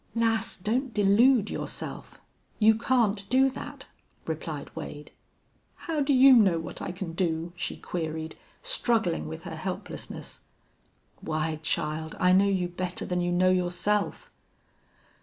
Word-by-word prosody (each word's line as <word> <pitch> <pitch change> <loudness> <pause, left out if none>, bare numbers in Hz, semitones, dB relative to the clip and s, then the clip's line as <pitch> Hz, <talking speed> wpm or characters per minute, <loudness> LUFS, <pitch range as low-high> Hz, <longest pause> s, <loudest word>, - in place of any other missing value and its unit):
"Lass, 225 -1 +1
don't 235 +6 -1
delude 210 +3 +4
yourself. - - -6 0.4
You 220 0 +6
can't 220 -4 +1
do 265 +2 +4
that," - - -8 0.4
replied - - -5
Wade. - - -7 0.6
"How 325 -2 -3
do 285 +1 +1
you 265 0 +8
know 195 -7 +5
what 165 - -7
I - - -3
can 180 -2 -6
do?" 170 -1 -1
she 175 - -3
queried, 160 -2 -4 0.3
struggling 230 - 0
with 80 +1 -7
her - - -6
helplessness. - - -6 0.8
"Why, 155 0 -2
child, 160 0 -2
I 180 0 +4
know 195 +2 +5
you 185 -2 +1
better 180 +1 -4
than 180 0 -1
you 175 0 0
know 185 +1 +4
yourself." 185 +3 0
190 Hz, 135 wpm, -27 LUFS, 170-230 Hz, 0.8 s, you